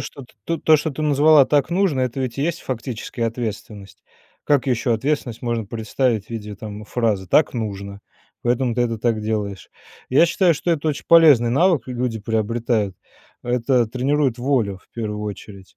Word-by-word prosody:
что, 140 - -8 0.2
т 165 +5 -2
тут 155 -1 +6
что 155 +2 -2
ты 150 +2 -5
назвала 150 0 +5
так 145 +2 +1
нужно- 175 -6 +1
это 130 +1 -2
ведь 130 0 -4
и - - 0
есть 170 +2 -1
фактически 125 -1 -6
ответственность. 110 -3 -5 0.4
Как 145 -2 +2
ещё 125 -1 +1
ответственность 125 -1 -2
можно 120 -2 -2
представить 110 +1 -1
в - - -24
виде 105 -2 -6
там 105 +1 -8
фразы: 105 -4 -1
"Так 150 - +3
нужно"- 100 -3 -5 0.4
поэтому 120 0 0
ты 125 - +1
это 115 -2 -2
так 115 -1 0
делаешь. 105 -3 -3 0.4
Я 145 +6 +5
считаю 170 0 +2
что 170 - -2
это 160 -1 0
очень 145 - -3
полезный 150 -8 +6
навык 150 -2 +2
л 125 - -5
люди 120 -2 -2
приобретают. 110 -2 -1 0.5
Это 120 0 +1
тренирует 130 +1 0
волю, 120 -7 0
в - - -32
первую 105 -2 -4
очередь. 100 -2 -9
120 Hz, 175 wpm, -21 LUFS, 110-140 Hz, 0.5 s, тут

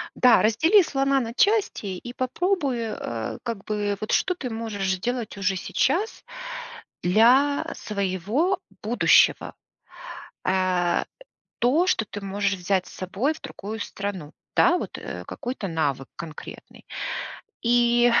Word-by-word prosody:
Да, 250 -2 +6
раздели 315 - +5
слона 275 -2 +1
на 230 -2 -4
части 405 - +2
и 240 +6 -8
попробуй, 280 +1 0
э, 120 - -4
как 230 -5 -4
бы 205 -1 -1
вот 215 - -3
что 365 - +2
ты 265 -7 -5
можешь 220 -4 -3
сделать 225 +4 -2
уже 195 -1 +1
сейчас 275 - 0 0.8
для 250 +10 +4
своего 210 - -1 0.2
будущего. 230 +3 +4 0.9
А, 185 -2 +2
э, - - -4 0.6
то, 290 +10 +3
что 225 - +2
ты 205 - -7
можешь 200 +1 0
взять 185 0 0
с - - -12
собой 195 - -1
в - - -14
другую 215 +3 -7
страну. 195 -7 -5 0.2
Да 355 0 +5
вот, - - -5
э, - - -7
какой-то 245 -5 -5
навык 145 -6 -1
конкретный. 160 -3 -10 0.8
И 240 0 +4
225 Hz, 130 wpm, -25 LUFS, 190-260 Hz, 0.9 s, Да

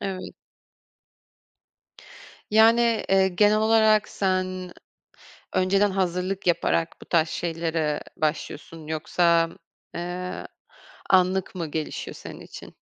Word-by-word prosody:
Evet. 190 -2 -5 2.2
Yani, 230 +1 +4
eee, 190 0 +4
genel 210 +3 +3
olarak 220 -1 +4
sen 185 -1 -2 0.8
önceden 195 +2 +2
hazırlık 185 0 -2
yaparak 165 -1 0
bu - - -11
tarz 165 -2 +2
şeylere 165 -3 -2 0.2
başlıyorsun. 155 +1 -4
Yoksa, 165 +1 +2 0.5
eee, 180 +1 -5 0.6
anlık 185 0 +2
mı 170 -3 -3
gelişiyor 155 0 -4
senin - - -10
için? - - -11
185 Hz, 95 wpm, -25 LUFS, 165-195 Hz, 2.2 s, Yani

